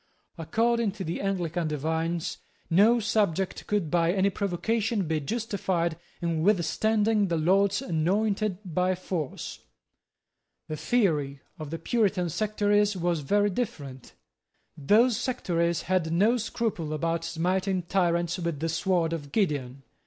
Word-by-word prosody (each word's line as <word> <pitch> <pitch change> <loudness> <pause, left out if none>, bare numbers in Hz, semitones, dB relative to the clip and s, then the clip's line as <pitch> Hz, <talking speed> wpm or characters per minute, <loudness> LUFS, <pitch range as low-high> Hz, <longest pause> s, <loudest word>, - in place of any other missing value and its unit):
According 225 +5 +1
to 195 - -6
the 165 0 -3
Anglican 175 -4 -1
divines, 160 +3 -2 0.3
no 215 +8 +5
subject 200 -4 0
could 205 -7 -1
by 170 -1 +3
any 195 +1 +2
provocation 200 +2 -1
be 160 -1 0
justified 190 -3 -1 0.3
in 165 -2 0
withstanding 210 +3 +2
the 170 -2 0
Lord's 195 +7 +2
anointed 195 +2 0
by 180 +2 0
force. 175 -5 -5 1.1
The 155 - -4
theory 150 - 0 0.2
of 155 -2 -6
the 165 - -4
Puritan 190 -1 0
sectaries 205 0 +1
was 175 -2 0
very 205 +8 +2
different. 145 - -5 0.6
Those 215 - +3
sectaries 170 -10 -1
had 180 -3 0
no 205 +8 +3
scruple 220 -9 -2
about 165 +2 -1
smiting 185 +3 -1
tyrants 170 -1 0
with 170 -4 -2
the 165 +2 -1
sword 165 0 +1
of 145 -4 -6
Gideon. 140 - -1
180 Hz, 125 wpm, -27 LUFS, 165-205 Hz, 1.1 s, no